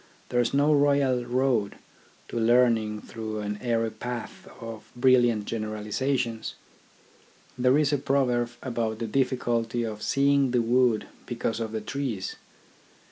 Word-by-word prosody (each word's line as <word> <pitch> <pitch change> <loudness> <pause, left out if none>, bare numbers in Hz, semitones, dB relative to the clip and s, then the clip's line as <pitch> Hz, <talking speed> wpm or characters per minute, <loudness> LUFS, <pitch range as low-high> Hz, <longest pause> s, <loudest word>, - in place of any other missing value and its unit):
There 120 - +1
is 120 -1 +2
no 145 +2 +3
royal 140 -4 +3
road 120 -4 +1 0.5
to 115 - -2
learning 115 -2 +3
through 110 -1 -5
an 105 0 -4
airy 115 -2 0
path 120 +1 -6
of 115 -2 -8
brilliant 120 -4 +4
generalisations. 115 +3 -2 1.0
There 125 +2 +3
is 150 -1 +2
a 145 - +2
proverb 125 -3 +1
about 115 -3 -2
the 115 - -3
difficulty 120 -1 0
of 110 -2 -5
seeing 140 +1 +3
the 120 -1 +2
wood 120 -1 +2 0.2
because 115 -2 -2
of 110 -1 -3
the 110 -1 -3
trees. 115 -4 -3
120 Hz, 135 wpm, -27 LUFS, 110-130 Hz, 1.0 s, brilliant